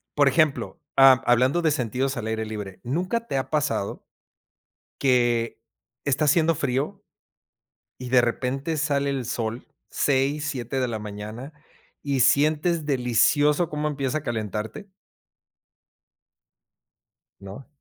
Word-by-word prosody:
por 145 Hz, -1 st, +4 dB
ejemplo, 155 Hz, 0 st, +1 dB, 0.2 s
ha 135 Hz, 0 st, +9 dB, 0.2 s
hablando 130 Hz, +7 st, +3 dB
de 160 Hz, -, +2 dB
sentidos 130 Hz, 0 st, -1 dB
al 115 Hz, -, -4 dB
aire 110 Hz, 0 st, -2 dB
libre, 105 Hz, -3 st, -7 dB
¿nunca 185 Hz, -, -2 dB
te 135 Hz, -, -2 dB
ha 130 Hz, -, -3 dB
pasado 150 Hz, -9 st, -1 dB, 1.0 s
que 120 Hz, -3 st, +2 dB, 0.5 s
está 140 Hz, +2 st, +1 dB
haciendo 160 Hz, +2 st, +3 dB
frío 145 Hz, +6 st, -2 dB, 1.0 s
y 125 Hz, -1 st, -6 dB
de 125 Hz, -1 st, +6 dB
repente 130 Hz, +6 st, -2 dB
sale 140 Hz, -2 st, 0 dB
el 135 Hz, -2 st, -2 dB
sol, 115 Hz, 0 st, -4 dB, 0.2 s
6, 140 Hz, +2 st, +1 dB
7 130 Hz, -1 st, -3 dB
de 125 Hz, -, 0 dB
la 115 Hz, -2 st, -3 dB
mañana 105 Hz, +6 st, -8 dB, 0.5 s
y 140 Hz, -2 st, -1 dB
sientes 155 Hz, +5 st, +3 dB
delicioso 145 Hz, +5 st, +2 dB
cómo 150 Hz, 0 st, -2 dB
empieza 140 Hz, -1 st, -2 dB
a -, -, -9 dB
calentarte? 110 Hz, -, -4 dB, 2.5 s
No. 100 Hz, +7 st, -10 dB
135 Hz, 120 wpm, -24 LUFS, 120-150 Hz, 2.5 s, ha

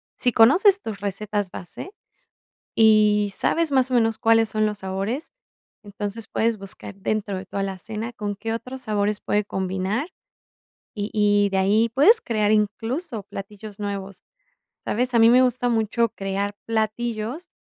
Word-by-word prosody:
sí 245 Hz, -, +1 dB
conoces 370 Hz, -, +5 dB
tus 215 Hz, -3 st, -6 dB
recetas 205 Hz, 0 st, -3 dB
base 180 Hz, -, -9 dB, 0.8 s
y 210 Hz, -2 st, +4 dB
sabes 330 Hz, +8 st, 0 dB
más 260 Hz, -2 st, +3 dB
o -, -, -4 dB
menos 225 Hz, -2 st, +2 dB
cuáles 225 Hz, 0 st, +3 dB
son 215 Hz, 0 st, +1 dB
los 210 Hz, -1 st, -2 dB
sabores, 195 Hz, +10 st, -4 dB, 0.5 s
entonces 205 Hz, +1 st, -4 dB
puedes 230 Hz, 0 st, 0 dB
buscar 195 Hz, +1 st, -4 dB
dentro 200 Hz, 0 st, -2 dB
de 190 Hz, +1 st, -7 dB
tu -, -, -9 dB
alacena 210 Hz, +4 st, -4 dB
con 205 Hz, -3 st, -4 dB
qué 225 Hz, +2 st, -4 dB
otros 255 Hz, +3 st, -7 dB
sabores 210 Hz, -2 st, 0 dB
puede 210 Hz, 0 st, 0 dB
combinar, 190 Hz, -, -2 dB, 0.9 s
y 205 Hz, 0 st, -4 dB
y 205 Hz, -1 st, +3 dB
de 195 Hz, -, -1 dB
ahí 210 Hz, +4 st, +3 dB
puedes 420 Hz, -, +5 dB
crear 215 Hz, -2 st, 0 dB
incluso 225 Hz, -, -1 dB
platillos 200 Hz, +1 st, -10 dB
nuevos, 200 Hz, -2 st, -5 dB, 0.6 s
¿sabes? 250 Hz, +3 st, -1 dB
A -, -, +5 dB
mí 225 Hz, 0 st, +7 dB
me 250 Hz, +2 st, +6 dB
gusta 250 Hz, -1 st, +1 dB
mucho 230 Hz, 0 st, +1 dB
crear 200 Hz, +1 st, -3 dB
platillos, 230 Hz, +7 st, -2 dB
215 Hz, 150 wpm, -23 LUFS, 200-230 Hz, 0.9 s, mí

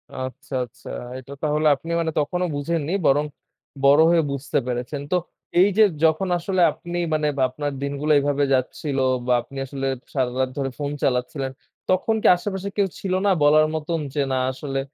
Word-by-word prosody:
আচ্ছা, 130 Hz, +1 st, -7 dB
আচ্ছা। 115 Hz, -, -14 dB, 0.3 s
এটা 130 Hz, +2 st, -10 dB
তাহলে 150 Hz, 0 st, +2 dB
আপনি 160 Hz, +5 st, -8 dB
মানে 165 Hz, -1 st, 0 dB
তখনো 180 Hz, +5 st, 0 dB
বুঝেননি, 155 Hz, +2 st, -2 dB
বরং 145 Hz, +2 st, +4 dB, 0.6 s
বড় 140 Hz, +2 st, +6 dB
হয়ে 170 Hz, -1 st, +4 dB
বুঝতে 140 Hz, +1 st, -2 dB
পেরেছেন। 125 Hz, +3 st, -3 dB
তো 180 Hz, -, +4 dB, 0.4 s
এইযে 200 Hz, +3 st, +5 dB, 0.2 s
যখন 160 Hz, +4 st, +3 dB
আসলে 185 Hz, +2 st, -1 dB
আপনি 175 Hz, 0 st, -6 dB, 0.2 s
মানে 155 Hz, -1 st, +1 dB, 0.2 s
আপনার 145 Hz, +3 st, -3 dB
দিনগুলা 140 Hz, +2 st, 0 dB
এভাবে 145 Hz, 0 st, +1 dB
যাচ্ছিল, 135 Hz, +2 st, -1 dB, 0.3 s
বা 125 Hz, -, +3 dB
আপনি 135 Hz, -, -12 dB
আসলে 135 Hz, 0 st, -4 dB, 0.3 s
সারারাত 130 Hz, -1 st, 0 dB
ধরে 135 Hz, -1 st, -1 dB
ফোন 145 Hz, -1 st, -2 dB
চালাচ্ছিলেন, 130 Hz, +1 st, -1 dB, 0.4 s
তখন 185 Hz, +4 st, +2 dB
কি -, -, +3 dB
আশেপাশে 195 Hz, +1 st, -4 dB
কেউ 200 Hz, -, +3 dB
ছিল 190 Hz, -2 st, -2 dB
না 200 Hz, -, +4 dB
বলার 155 Hz, +1 st, +6 dB
মতন, 160 Hz, +2 st, -2 dB
যে 145 Hz, -, 0 dB
না 130 Hz, -, +1 dB
আসলে 135 Hz, +1 st, -4 dB
145 Hz, 165 wpm, -23 LUFS, 135-170 Hz, 0.6 s, বড়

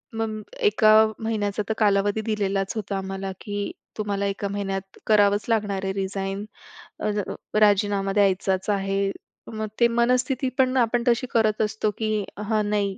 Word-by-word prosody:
मग 220 Hz, -1 st, -2 dB, 0.2 s
1का 325 Hz, -, +4 dB, 0.3 s
महिन्याचा 210 Hz, -2 st, -1 dB
तर 220 Hz, -, +2 dB
कालावधी 205 Hz, 0 st, +2 dB
दिलेलाच 195 Hz, -3 st, -1 dB
होता 200 Hz, -2 st, -3 dB
आम्हाला, 195 Hz, 0 st, -4 dB
की 205 Hz, -1 st, -3 dB, 0.3 s
तुम्हाला 200 Hz, -2 st, -1 dB
1का 200 Hz, 0 st, -2 dB
महिन्यात 195 Hz, -1 st, -4 dB
करावंच 205 Hz, -1 st, +4 dB
लागणार 205 Hz, -4 st, 0 dB
आहे 190 Hz, -, -1 dB
रीजाईन 195 Hz, +1 st, -3 dB, 0.5 s
अ, -, -, -1 dB
ज 205 Hz, 0 st, -1 dB, 0.4 s
राजीनामा 200 Hz, -1 st, +3 dB
द्यायचाच 195 Hz, -1 st, +1 dB
आहे. 195 Hz, 0 st, 0 dB, 0.4 s
मग 220 Hz, 0 st, -3 dB
ते 235 Hz, -, +6 dB
मनस्थिती 250 Hz, +3 st, +1 dB
पण 260 Hz, -1 st, +3 dB
आपण 240 Hz, -1 st, +2 dB
तशी 245 Hz, +2 st, +2 dB
करत 220 Hz, -2 st, +2 dB
असतो, 215 Hz, 0 st, 0 dB
की 215 Hz, -2 st, 0 dB
हा 215 Hz, +1 st, 0 dB
नाही, 205 Hz, -2 st, -1 dB
205 Hz, 150 wpm, -24 LUFS, 195-220 Hz, 0.5 s, ते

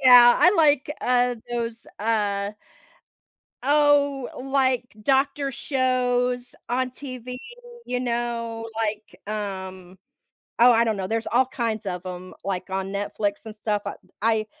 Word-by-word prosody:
yeah, 245 Hz, -2 st, +9 dB
I 360 Hz, -, +7 dB
like, 295 Hz, -3 st, +4 dB
uh, 245 Hz, 0 st, +2 dB
those, 230 Hz, -1 st, -3 dB
uh, 205 Hz, -2 st, 0 dB, 1.1 s
oh, 285 Hz, -1 st, +3 dB
like, 260 Hz, -2 st, +1 dB, 0.2 s
doctor 275 Hz, +2 st, +2 dB
shows 250 Hz, -2 st, 0 dB
on 255 Hz, +1 st, 0 dB
TV, 255 Hz, -1 st, -7 dB, 0.5 s
you 250 Hz, 0 st, -2 dB
know, 235 Hz, -2 st, -2 dB
like, 215 Hz, -4 st, -3 dB, 0.2 s
um, 190 Hz, -2 st, -6 dB, 0.6 s
oh, 245 Hz, +1 st, +8 dB
I 230 Hz, +1 st, +4 dB
don't 220 Hz, -3 st, 0 dB
know, 190 Hz, -, -3 dB
there's 225 Hz, +2 st, -2 dB
all 250 Hz, +2 st, +3 dB
kinds 230 Hz, -5 st, -3 dB
of 180 Hz, -1 st, -4 dB
'em, 185 Hz, 0 st, -7 dB
like, 190 Hz, -1 st, -3 dB
on 190 Hz, 0 st, -2 dB
Netflix 205 Hz, +1 st, -2 dB
and 215 Hz, -, -8 dB
stuff, 210 Hz, -1 st, -1 dB
uh -, -, -3 dB
b 185 Hz, -, -27 dB
I 220 Hz, -1 st, +2 dB
235 Hz, 135 wpm, -24 LUFS, 210-255 Hz, 1.1 s, yeah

